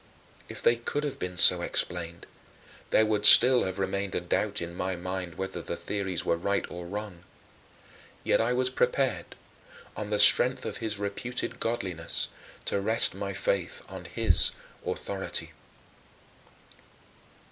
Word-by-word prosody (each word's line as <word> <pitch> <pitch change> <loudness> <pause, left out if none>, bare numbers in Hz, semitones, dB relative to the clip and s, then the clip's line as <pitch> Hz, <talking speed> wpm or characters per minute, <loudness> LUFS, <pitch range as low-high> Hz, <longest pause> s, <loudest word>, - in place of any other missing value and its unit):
If - - -9
they 120 - +3
could 145 +5 -4
have 145 -2 -4
been 90 0 -5
so 90 0 +8
explained, 85 -1 -1 0.6
there 110 - +3
would 105 -1 -1
still 125 +4 +8
have 95 0 -4
remained 100 0 -3
a - - +1
doubt 100 +4 -2
in 85 0 -6
my 90 +1 -3
mind 90 0 -6
whether 95 -2 -5
the 85 - -5
theories 95 -4 -3
were 85 - +1
right 100 +4 -1
or 85 0 -8
wrong. 100 -2 -7 1.0
Yet - - +2
I 115 +2 0
was 130 +1 0
prepared, 130 0 -1 0.6
on 105 -1 -6
the 105 - 0
strength 125 +4 +5
of - - -4
his 110 -3 -3
reputed 100 +5 -5
godliness, 95 -8 -2 0.4
to 100 - -1
rest 110 +3 +3
my - - -5
faith - - -2
on - - -9
his - - +1 0.3
authority. - - -4
100 Hz, 145 wpm, -27 LUFS, 90-115 Hz, 1.0 s, so